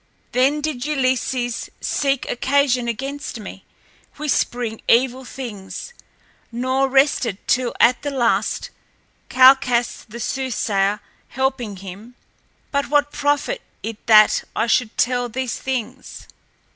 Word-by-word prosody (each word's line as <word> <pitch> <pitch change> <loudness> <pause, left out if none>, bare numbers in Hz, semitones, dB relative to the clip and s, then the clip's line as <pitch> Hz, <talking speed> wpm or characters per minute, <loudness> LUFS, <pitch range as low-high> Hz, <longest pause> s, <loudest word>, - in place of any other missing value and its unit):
Then 270 +4 +2
did 290 -5 -3
Ulysses 255 -4 -1
seek 275 -2 -1
occasion 260 -1 +1
against 270 +2 -4
me, 195 -2 -9 0.5
whispering 245 -6 -1
evil 255 +2 +3
things, 240 - -7 0.6
nor 260 +3 0
rested 270 -6 +2
till 250 -1 +1
at 240 +1 +4
the 290 - -3
last, 230 -6 0 0.6
Calchas 255 -2 +4
the 235 +2 -8
soothsayer 210 -6 -1 0.3
helping 260 -5 -2
him 195 +6 -10 0.6
but 280 -3 -1
what 290 0 +2
profit 290 - 0 0.2
it 225 -1 -6
that 215 -2 +6
I 220 - +1
should 225 0 +1
tell 245 -1 +1
these 255 +1 -3
things? 255 0 -5
250 Hz, 110 wpm, -21 LUFS, 230-270 Hz, 0.6 s, that